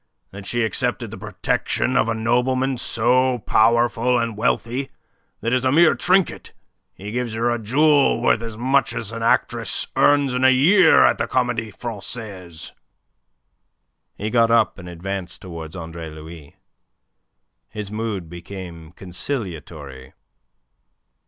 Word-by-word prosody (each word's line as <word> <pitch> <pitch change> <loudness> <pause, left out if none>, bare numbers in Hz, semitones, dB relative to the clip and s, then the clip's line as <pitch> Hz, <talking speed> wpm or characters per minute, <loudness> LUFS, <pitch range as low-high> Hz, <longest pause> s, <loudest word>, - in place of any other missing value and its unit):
That 100 0 -10
she 120 -1 0
accepted 110 -4 -2
the - - -8
protection - - -1
of 115 - +2
a 115 - 0
nobleman 125 +3 0
so 125 +2 +2
powerful 120 +2 +3
and 115 -2 -2
wealthy 120 +5 -1 0.5
that 115 - -1
as 130 0 +1
a 130 - +2
mere 160 +2 +5
trinket 185 0 +1 0.4
he 100 +2 -8
gives 120 -1 -3
her 115 +2 0
a 120 - -1
jewel 140 +5 +3
worth 120 -1 +2
as 115 -2 -7
much 130 +1 +1
as 110 -2 -4
an 115 0 -6
actress 115 - +1
earns 145 -2 +3
in 125 +1 -1
a 130 - +7
year 160 +7 +5
at - - +3
the - - -1
Comedie 125 -3 -1
Francaise?" 100 -5 -7 1.5
He 105 +2 -4
got 115 -1 +3
up, 115 -3 +2
and 90 -1 -9
advanced 90 +1 -5
towards 80 -3 -8
Andre 80 -2 -7
Louis. 80 -1 -12 1.1
His 105 -2 -7
mood 105 -5 -4
became 85 -1 -10
conciliatory. 85 - -6
115 Hz, 135 wpm, -21 LUFS, 95-125 Hz, 1.5 s, a